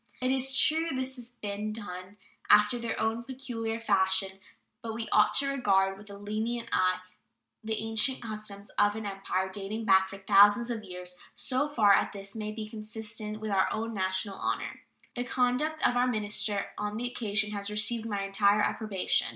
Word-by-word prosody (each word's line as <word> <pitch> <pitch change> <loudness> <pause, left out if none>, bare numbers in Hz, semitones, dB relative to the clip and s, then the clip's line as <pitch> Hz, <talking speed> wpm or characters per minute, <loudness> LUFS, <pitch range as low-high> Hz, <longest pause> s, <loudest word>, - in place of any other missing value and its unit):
It 255 0 +1
is 265 0 +1
true 320 +4 +3
this 260 0 -3
has 240 -1 -9
been 210 -3 -4
done 185 -2 -8 0.3
after 210 +3 +6
their 235 -1 -3
own 225 +1 0
peculiar 235 -3 -4
fashion; 190 -3 +1 0.4
but 225 -2 -5
we 225 0 -3
ought 210 - +4
to 280 - +4
regard 195 -8 +2
with 205 +1 -14
a 200 - -9
lenient 220 +3 -3
eye 185 0 +2 0.6
the 220 0 -1
ancient 225 +4 +1
customs 215 -3 -6
of 205 0 +4
an 220 -1 -5
empire 195 -1 -2
dating 200 +3 -5
back 190 -2 +5
for 195 - -8
thousands 205 +4 +5
of 225 -2 -4
years, 180 -2 -7 0.2
so 270 +3 0
far 215 -8 +5
as - - +2
this 195 0 -7
may 215 -1 -4
be 215 0 -6
consistent 215 -1 -6
with 215 -1 -4
our 190 -1 +2
own 225 +1 -3
national 190 0 -1
honor. - - -3 0.3
The 245 - -2
conduct 255 +6 +1
of 245 - 0
our 245 +1 +3
minister 210 -3 0
on 210 0 -2
the 240 - -3
occasion 215 -3 -1
has 200 -1 -3
received 215 +2 +1
my 200 -2 -2
entire 200 +1 +3
approbation. 210 -3 +1
215 Hz, 180 wpm, -29 LUFS, 200-235 Hz, 0.6 s, after